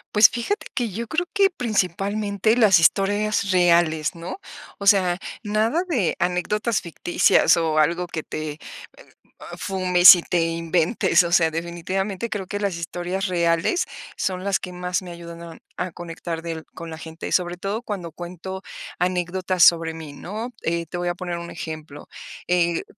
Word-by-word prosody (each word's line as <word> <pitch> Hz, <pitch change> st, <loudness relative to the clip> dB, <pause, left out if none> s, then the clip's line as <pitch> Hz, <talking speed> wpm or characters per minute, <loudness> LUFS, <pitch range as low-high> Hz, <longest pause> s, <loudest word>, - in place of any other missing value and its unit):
Pues, 210 Hz, -, +8 dB
fíjate 245 Hz, -, -3 dB
que 240 Hz, -3 st, -1 dB
yo 230 Hz, +4 st, -5 dB
creo 350 Hz, +3 st, 0 dB
que 395 Hz, -2 st, +4 dB
principalmente 205 Hz, -, 0 dB
las 215 Hz, -7 st, +6 dB
historias 200 Hz, +3 st, +2 dB
reales, 170 Hz, -3 st, +3 dB
¿no? 170 Hz, -, -7 dB, 0.4 s
O 200 Hz, -, -4 dB
sea, 185 Hz, -3 st, +4 dB, 0.2 s
nada 220 Hz, -, +1 dB
de 225 Hz, -, +1 dB
anécdotas 210 Hz, +5 st, 0 dB
ficticias 175 Hz, 0 st, +3 dB
o 160 Hz, -2 st, +1 dB
algo 170 Hz, +4 st, +1 dB
que 160 Hz, -2 st, -5 dB
te, 155 Hz, -1 st, -5 dB
eh, -, -, -15 dB, 1.0 s
fumes 185 Hz, -1 st, +7 dB
y 175 Hz, -, -3 dB
te 175 Hz, 0 st, 0 dB
inventes. 165 Hz, +4 st, +2 dB
O 170 Hz, 0 st, -2 dB
sea, 165 Hz, -3 st, +4 dB
definitivamente 180 Hz, +6 st, -3 dB
creo 195 Hz, -4 st, -4 dB
que 205 Hz, +1 st, -4 dB
las 195 Hz, -4 st, -1 dB
historias 175 Hz, +3 st, -3 dB
reales 170 Hz, -, +1 dB, 0.3 s
son 185 Hz, 0 st, -2 dB
las 200 Hz, -1 st, +1 dB
que 180 Hz, -, -6 dB
más 180 Hz, +1 st, -2 dB
me 180 Hz, -1 st, -9 dB
ayudan 170 Hz, 0 st, -10 dB
a 165 Hz, -1 st, -10 dB, 0.2 s
a 180 Hz, 0 st, -3 dB
conectar 165 Hz, 0 st, -6 dB
del 165 Hz, -1 st, -5 dB
con 165 Hz, 0 st, -8 dB
la 160 Hz, -, -7 dB
gente, 160 Hz, +1 st, -7 dB
sobre 175 Hz, -1 st, +1 dB
todo 200 Hz, +5 st, -3 dB
cuando 190 Hz, -8 st, -6 dB
cuento 180 Hz, +3 st, -7 dB, 0.4 s
anécdotas 180 Hz, 0 st, +1 dB
sobre 165 Hz, -1 st, +4 dB
mí, 160 Hz, -3 st, -9 dB
¿no? 220 Hz, +10 st, -6 dB
Eh, 170 Hz, +1 st, -1 dB
te 160 Hz, -, -9 dB
voy 175 Hz, 0 st, -1 dB
a 175 Hz, -, -2 dB
poner 175 Hz, -1 st, -4 dB
un 170 Hz, 0 st, -8 dB
ejemplo. 155 Hz, -3 st, -8 dB, 0.4 s
Eh, 170 Hz, -1 st, +1 dB
180 Hz, 165 wpm, -23 LUFS, 170-200 Hz, 1.0 s, Pues